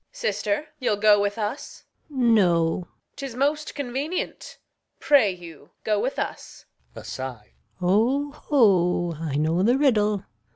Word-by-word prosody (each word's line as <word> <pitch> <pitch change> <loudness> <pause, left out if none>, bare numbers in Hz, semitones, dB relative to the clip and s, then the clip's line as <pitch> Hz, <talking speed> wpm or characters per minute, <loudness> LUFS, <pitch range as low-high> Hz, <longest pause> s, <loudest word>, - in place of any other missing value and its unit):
Sister, 310 -11 -2
you'll 245 -5 +1
go 205 0 +5
with 205 +1 -1
us? 215 +6 -5 0.3
Gon. 250 -5 +2
No. 170 -6 +3
Reg. 180 - -6 0.3
'Tis 275 -4 -6
most 295 +4 -1
convenient. 285 +5 -4 0.4
Pray 275 -8 +4
you 170 -5 -10
go 210 -1 +1
with 260 +6 -2
us. - - -6 0.3
Gon. - - -9
[aside] 125 -5 -7 0.3
O, 235 +11 +1
ho, 180 - +2
I 160 -4 -3
know 160 +4 +1
the 240 +6 +3
riddle. 210 -8 +2
215 Hz, 135 wpm, -24 LUFS, 180-275 Hz, 0.4 s, go